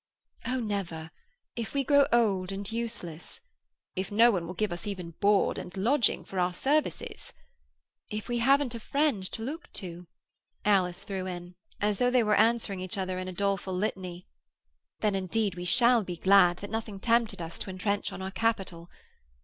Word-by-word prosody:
"Oh, 255 +1 0
never! 185 -8 -3 0.4
If 235 +3 -5
we 275 - +2
grow 285 0 +5
old 195 -6 +2
and 200 +2 -5
useless—" 225 - -5 0.6
"If 190 +2 -3
no 230 +3 +6
one 175 -5 -2
will 180 - -6
give 215 -1 -1
us 175 +3 -6
even 180 -4 -5
board 205 -1 +3
and 180 - -8
lodging 240 +5 +2
for 190 - -4
our 180 0 +1
services—" 295 - -1 0.8
"If 215 -1 -5
we 240 -1 -1
haven't 270 +1 +3
a 230 - -5
friend 280 -4 0
to 225 - -5
look 305 +8 -6
to," 175 -1 -5 0.6
Alice 185 -4 +2
threw 190 -2 -4
in, 175 -1 -6 0.3
as 205 -1 0
though 245 - +4
they 250 -1 +4
were 210 -1 +2
answering 220 -3 +2
each 185 +1 -4
other 185 -1 -2
in 185 - -4
a - - -4
doleful 195 0 -1
litany, 185 -2 -3 0.8
"then 210 -2 +2
indeed 195 +2 0
we 175 0 -6
shall 235 +3 +6
be 180 -2 -6
glad 190 -2 +5
that 205 +1 -8
nothing 220 -3 -4
tempted 230 -1 +2
us 165 -1 -6
to - - -3
entrench 200 +2 -1
on 190 - -6
our 190 - -4
capital! 190 -6 -1
200 Hz, 180 wpm, -29 LUFS, 185-230 Hz, 0.8 s, no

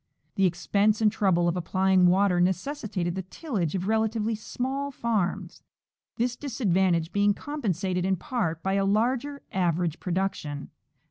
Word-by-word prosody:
The 195 -2 +3
expense 200 +4 +1
and 215 -2 +4
trouble 185 -5 +2
of 170 - +1
applying 185 +1 +3
water 180 0 +3
necessitated 190 - -1
the 190 - -3
tillage 190 - -3
of 185 0 -2
relatively 220 0 +1
small 265 +6 -3
farms, 230 -8 -2 0.5
this 245 +1 0
disadvantage 190 - +1
being 205 0 +3
compensated 190 - -2
in 190 +1 +2
part 170 -5 -2
by 190 - 0
a 195 0 +2
larger 250 +7 0
average 175 -3 0
production. 180 -6 -3
195 Hz, 135 wpm, -27 LUFS, 180-225 Hz, 0.5 s, and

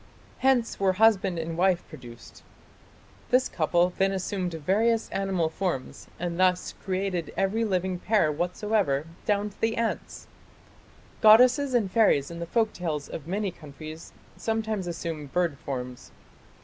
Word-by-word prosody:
"Hence 260 -3 +2
were 195 -1 +3
husband 200 -3 +3
and 165 0 -3
wife 180 0 +1
produced." 120 -1 -12 0.9
This 255 +1 +3
couple 175 +2 +1
then 195 0 +3
assumed 190 -1 -2
various 210 +9 +1
animal 195 -4 0
forms 160 -5 -4
and 175 0 -3
thus 185 -1 +2
"created 185 -4 -2
every 195 +4 +1
living 185 -3 -1
pair 195 -6 +2
whatsoever 175 -2 0 0.2
down 205 0 +1
to - - -25
the 225 0 +1
ants". 230 -1 -3 1.0
Goddesses 250 +5 +6
and 210 -6 +1
fairies 180 -11 +3
in 170 - -7
the 170 - -5
folk 220 +3 +1
tales 155 -5 -4
of 155 - -7
many 195 +2 -1
countries 155 0 -10 0.3
sometimes 220 -4 -2
assume 165 -3 -5
bird 165 -1 -1
forms. 125 -2 -6
185 Hz, 135 wpm, -27 LUFS, 165-215 Hz, 1.0 s, Goddesses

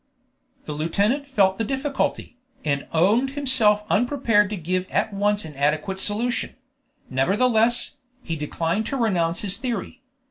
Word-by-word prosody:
The 150 - -5
lieutenant 200 - 0
felt 195 -7 +2
the - - +1
difficulty, 270 +1 -2 0.3
and 140 -2 -1
owned 210 +11 +3
himself 230 -7 +4
unprepared 230 -3 +2
to 210 - -4
give 185 +2 -2
at 215 - 0
once 205 -1 0
an 155 - -9
adequate 150 +7 0
solution; 225 +5 -1 0.6
nevertheless, 225 - +2 0.3
he 165 - -3
declined 165 +7 -2
to 275 - -2
renounce 175 -8 0
his 200 -1 0
theory. 245 +1 -4
205 Hz, 135 wpm, -23 LUFS, 170-245 Hz, 0.6 s, himself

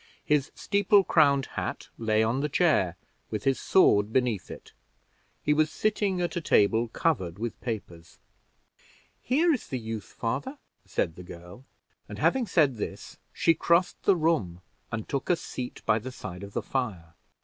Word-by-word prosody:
His 150 -1 +1
steeple 200 0 +3
crowned 140 -6 +4
hat - - -5
lay 110 -1 +1
on 115 +4 0
the 150 +2 -1
chair, - - +2 0.3
with 105 -2 -4
his 135 -1 +1
sword 105 - +4
beneath 120 -6 0
it. - - -11 0.7
He 150 - +3
was 155 0 +2
sitting 205 0 0
at 175 - -2
a 175 - -1
table 115 -4 +3
covered 110 - -1
with 115 +2 -5
papers. 90 -8 -6 1.0
"Here 315 +7 +3
is 255 - -4
the 130 - -3
youth, 110 -3 -5
father," 135 - -3 0.3
said 80 - -1
the 90 - -9
girl; 90 +8 -12 0.4
and - - -7
having 260 -3 +2
said 145 - +3
this, - - -6
she 165 - +3
crossed 170 +3 +1
the 195 - +4
room 140 - 0 0.3
and 110 -1 -4
took 140 -2 -3
a 180 - +5
seat 125 -6 -7
by 110 0 +3
the 130 +4 -7
side 95 -6 -8
of 100 0 -9
the - - -2
fire. 95 -11 -3
125 Hz, 165 wpm, -27 LUFS, 105-165 Hz, 1.0 s, a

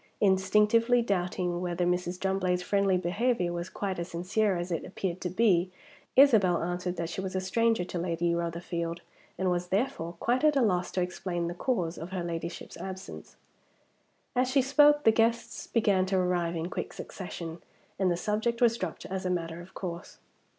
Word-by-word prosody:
Instinctively 210 +5 +4
doubting 180 -3 -1
whether 175 0 -1
Mrs. 180 0 -1
Drumblade's 185 -2 0
friendly 195 0 +2
behavior 180 +1 0
was 175 +1 -4
quite 195 -3 -3
as 170 - -3
sincere 190 +3 0
as 175 +1 -4
it 165 - -1
appeared 185 -1 -4
to 180 - -2
be, 185 -2 +3 0.5
Isabel 215 -12 +5
answered 180 +1 -2
that 170 -1 -3
she 175 +3 -4
was 190 0 -5
a - - +2
stranger 225 +2 +1
to 175 0 -4
Lady 170 0 0
Rotherfield, 170 0 -3 0.4
and 185 0 +1
was 175 0 -1
therefore 195 -4 -1
quite 240 - 0
at 305 -1 +5
a 275 - +4
loss 180 -4 +1
to 180 - +1
explain 175 -1 -3
the 170 - -3
cause 175 -4 -1
of 165 - -6
her 185 -2 -3
ladyship's 170 0 -5
absence. 190 0 -8 1.0
As 250 0 +2
she 270 0 +3
spoke, 295 +2 +5
the 225 - +7
guests 230 +1 0
began 200 -5 +2
to 190 0 +1
arrive 175 -2 0
in 165 +2 -3
quick - - -4
succession, 170 -3 -7 0.4
and 190 -2 +3
the 175 - +1
subject 220 +5 -1
was 235 -1 +4
dropped 185 -4 -4
as 190 0 -4
a 185 - -1
matter 170 -1 -2
of 175 - -15
course. 175 -1 -6
185 Hz, 180 wpm, -29 LUFS, 175-210 Hz, 1.0 s, the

